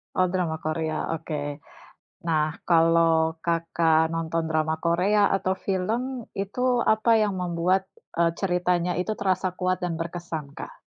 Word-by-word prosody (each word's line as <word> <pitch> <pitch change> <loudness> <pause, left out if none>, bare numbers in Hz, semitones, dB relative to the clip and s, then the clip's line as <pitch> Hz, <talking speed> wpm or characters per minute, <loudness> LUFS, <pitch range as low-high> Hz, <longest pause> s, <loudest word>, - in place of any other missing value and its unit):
Oh 185 0 +3
drama 175 -4 0
Korea, 155 0 -2
oke. 145 -2 -5 0.7
Nah, 155 -1 +2 0.2
kalau 165 -1 +4
Kakak 165 -1 +2
nonton 165 0 -1
drama 160 0 0
Korea 190 +6 +2
atau 190 -1 +1
film 230 +8 -2
itu 245 +6 0 0.2
apa 220 +2 0
yang 205 -2 0
membuat 180 +1 +1 0.4
eee 170 -1 +3
ceritanya 180 -1 +1
itu 215 +4 -1
terasa 185 -1 +1
kuat 185 0 0
dan 175 -2 -1
berkesan 165 -3 -5
Kak? - - -9
170 Hz, 130 wpm, -25 LUFS, 160-190 Hz, 0.7 s, kalau